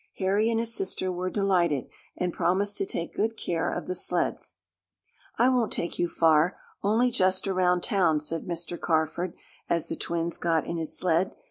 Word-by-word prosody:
Harry 200 Hz, +3 st, +2 dB
and 225 Hz, -1 st, +1 dB
his 230 Hz, 0 st, 0 dB
sister 185 Hz, -2 st, -1 dB
were 180 Hz, +1 st, -2 dB
delighted, 180 Hz, -, +1 dB, 0.3 s
and 180 Hz, -1 st, -1 dB
promised 190 Hz, +4 st, +1 dB
to 195 Hz, -, -1 dB
take 170 Hz, -, -4 dB
good 225 Hz, +1 st, -1 dB
care 165 Hz, -5 st, -1 dB
of -, -, -4 dB
the 185 Hz, -, -2 dB
sleds. -, -, -1 dB, 0.8 s
"I 245 Hz, -, +4 dB
won't 245 Hz, -4 st, +1 dB
take 170 Hz, -, -3 dB
you 175 Hz, -, +2 dB
far 160 Hz, +1 st, +3 dB, 0.2 s
only 225 Hz, +5 st, +2 dB
just 185 Hz, -4 st, +2 dB
around 180 Hz, -2 st, +2 dB
town," 175 Hz, -7 st, +2 dB
said 160 Hz, +2 st, -3 dB
Mr. 175 Hz, 0 st, -4 dB
Carford, 160 Hz, +2 st, 0 dB, 0.3 s
as 170 Hz, -2 st, +1 dB
the -, -, -2 dB
twins 170 Hz, 0 st, -2 dB
got 165 Hz, -2 st, +1 dB
in 170 Hz, -, -3 dB
his 160 Hz, -1 st, -2 dB
sled. 180 Hz, +1 st, +1 dB
180 Hz, 175 wpm, -27 LUFS, 170-195 Hz, 0.8 s, I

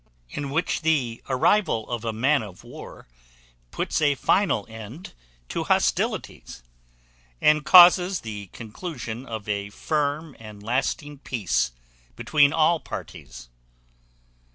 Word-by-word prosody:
In 145 Hz, -1 st, -4 dB
which 160 Hz, +5 st, -1 dB
the 140 Hz, -8 st, 0 dB
arrival 130 Hz, -, +2 dB
of 120 Hz, -2 st, -4 dB
a 115 Hz, -, -1 dB
man 135 Hz, +6 st, +2 dB
of 100 Hz, -4 st, -11 dB
war -, -, -11 dB, 0.6 s
puts -, -, -2 dB
a 145 Hz, -2 st, +3 dB
final 145 Hz, -, +1 dB
end 115 Hz, -, -10 dB, 0.4 s
to -, -, -3 dB
hostilities, 60 Hz, -, -1 dB, 0.8 s
and 150 Hz, 0 st, +3 dB
causes 180 Hz, +1 st, +7 dB
the 105 Hz, -3 st, -7 dB
conclusion 120 Hz, -, -7 dB
of 110 Hz, -3 st, -6 dB
a 100 Hz, -1 st, -2 dB
firm 150 Hz, +5 st, -2 dB
and 105 Hz, -2 st, -11 dB
lasting 135 Hz, +5 st, -2 dB
peace 90 Hz, -, -1 dB, 0.4 s
between 145 Hz, -, +3 dB
all 160 Hz, +2 st, +3 dB
parties. -, -, -9 dB
135 Hz, 115 wpm, -24 LUFS, 110-155 Hz, 0.8 s, causes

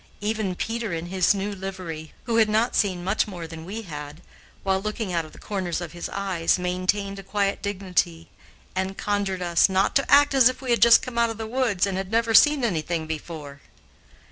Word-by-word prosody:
Even 210 Hz, -3 st, -2 dB
Peter 230 Hz, +1 st, -3 dB
in 165 Hz, 0 st, -3 dB
his 185 Hz, +1 st, +3 dB
new 200 Hz, +1 st, -3 dB
livery, 185 Hz, -5 st, -6 dB
who 230 Hz, -1 st, 0 dB
had 220 Hz, -1 st, +4 dB
not 220 Hz, +3 st, +1 dB
seen 185 Hz, -4 st, +1 dB
much 195 Hz, +5 st, +1 dB
more 175 Hz, -5 st, -7 dB
than 160 Hz, 0 st, -9 dB
we 215 Hz, +5 st, -6 dB
had, 150 Hz, -2 st, -8 dB, 0.4 s
while 190 Hz, -1 st, +1 dB
looking 215 Hz, -2 st, -3 dB
out 165 Hz, -2 st, 0 dB
of 155 Hz, -, -13 dB
the -, -, -15 dB
corners 185 Hz, -5 st, -3 dB
of 175 Hz, -3 st, -6 dB
his 175 Hz, +1 st, -6 dB
eyes, 190 Hz, -5 st, 0 dB
maintained 185 Hz, +2 st, -1 dB
a -, -, -6 dB
quiet 200 Hz, 0 st, -1 dB
dignity 185 Hz, -4 st, -1 dB, 0.5 s
and 190 Hz, +1 st, -2 dB
conjured 200 Hz, -3 st, -1 dB
us 170 Hz, +1 st, +3 dB
"not 190 Hz, +1 st, +1 dB
to 275 Hz, -, +1 dB
act 285 Hz, 0 st, +6 dB
as 260 Hz, -2 st, +6 dB
if 255 Hz, -, -6 dB
we 255 Hz, -2 st, -3 dB
had 235 Hz, -, +2 dB
just 235 Hz, 0 st, +7 dB
come 250 Hz, -3 st, -3 dB
out 235 Hz, 0 st, +3 dB
of 225 Hz, -, -5 dB
the 220 Hz, -, -4 dB
woods 225 Hz, -5 st, +1 dB
and 195 Hz, -2 st, -2 dB
had 190 Hz, -1 st, -5 dB
never 230 Hz, 0 st, +1 dB
seen 295 Hz, +2 st, +6 dB
anything 170 Hz, -5 st, -1 dB
before." 155 Hz, -3 st, -7 dB
195 Hz, 210 wpm, -24 LUFS, 175-220 Hz, 0.5 s, just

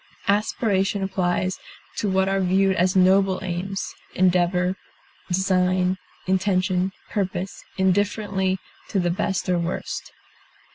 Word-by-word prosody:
Aspiration 200 Hz, -1 st, +1 dB
applies 185 Hz, -1 st, 0 dB, 0.4 s
to 210 Hz, -, 0 dB
what 190 Hz, 0 st, +2 dB
are 195 Hz, 0 st, +1 dB
viewed 190 Hz, +1 st, +3 dB
as 185 Hz, +2 st, +2 dB
noble 190 Hz, 0 st, +4 dB
aims; 190 Hz, +2 st, -3 dB, 0.2 s
endeavor, 180 Hz, 0 st, +2 dB, 0.5 s
design, 185 Hz, 0 st, +1 dB, 0.3 s
intention, 185 Hz, -1 st, +1 dB, 0.2 s
purpose, 190 Hz, -2 st, -3 dB
indifferently 190 Hz, 0 st, +1 dB, 0.3 s
to 200 Hz, -, 0 dB
the 175 Hz, -1 st, +1 dB
best 190 Hz, +1 st, -1 dB
or 180 Hz, -1 st, +2 dB
worst. 170 Hz, +1 st, -4 dB
190 Hz, 105 wpm, -24 LUFS, 180-195 Hz, 0.5 s, noble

